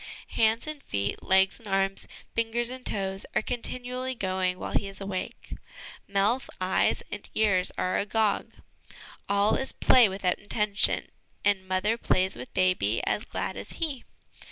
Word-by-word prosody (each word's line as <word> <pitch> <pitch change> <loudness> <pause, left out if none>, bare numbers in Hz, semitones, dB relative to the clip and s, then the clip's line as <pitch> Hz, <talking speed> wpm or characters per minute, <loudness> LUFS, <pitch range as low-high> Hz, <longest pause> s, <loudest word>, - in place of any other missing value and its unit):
Hands 225 +1 +2
and 305 -2 -6
feet, 100 - -2
legs 190 0 +3
and 225 - -13
arms, 195 0 0 0.3
fingers 230 +1 0
and 255 0 -7
toes, 195 -3 -3
are - - +2
continually 250 +1 -3
going 185 -3 -1
while - - -5
he 200 - 0
is 195 -1 -9
awake; 195 -2 -5 0.5
mouth, 205 +6 +1
eyes 185 0 +1
and 210 - -6
ears 195 -4 +3
are 185 - 0
agog. 210 0 0 0.8
All 200 +2 +3
is 265 - +2
play 245 -5 +5
without 190 -1 -1
intention, 205 0 +2 0.3
and 195 -2 +2
mother 210 +5 +1
plays 185 -3 +1
with 125 +1 -9
baby 185 - +2
as 210 - -1
glad - - -3
as - - -8
he. 300 -7 -2
200 Hz, 150 wpm, -28 LUFS, 190-230 Hz, 0.8 s, play